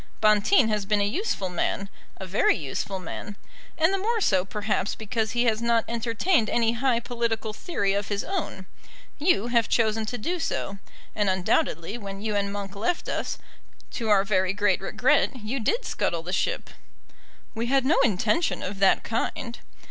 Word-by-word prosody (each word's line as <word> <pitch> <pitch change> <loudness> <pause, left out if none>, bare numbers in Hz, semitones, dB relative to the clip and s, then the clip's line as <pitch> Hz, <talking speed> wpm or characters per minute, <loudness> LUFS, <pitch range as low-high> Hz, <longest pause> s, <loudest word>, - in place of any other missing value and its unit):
Bonteen 215 - +4
has 210 -1 0
been 210 0 +2
a - - +3
useful 210 - -1
man, 180 +2 -1 0.3
a 190 - -6
very 185 +3 +2
useful 160 +6 -3
man; 190 +3 -7 0.4
and 325 +3 +3
the 390 - +1
more 450 +4 0
so 190 - +3
perhaps 205 0 -2
because 220 0 -2
he 240 0 +2
has 225 -1 +1
not 235 -1 +2
entertained 230 - +1
any 230 -1 +2
high 235 0 +1
political 230 -2 -2
theory 205 - -1
of 200 0 -1
his 200 -1 -2
own. 345 - -4 0.5
You 285 - +2
have 235 -2 +2
chosen 220 -1 +1
to 245 - -3
do 345 +11 -2
so, 200 -10 -3 0.4
and 205 -2 +1
undoubtedly 185 +1 0
when 195 -2 -7
you 215 0 -2
and 200 0 0
Monk 200 -1 -5
left 235 - -1
us, - - -2 0.5
to 225 -3 -3
our 200 -2 +5
very 190 -2 +1
great 205 -2 +1
regret, - - +2
you 245 +3 -3
did 460 - 0
scuttle - - -1
the - - -5
ship." - - -1 0.8
"We 230 0 -2
had 265 0 +2
no 310 +5 +4
intention 265 - +1
of 195 +1 -5
that 195 -1 +4
kind." 235 +1 -3
220 Hz, 175 wpm, -26 LUFS, 200-240 Hz, 0.8 s, our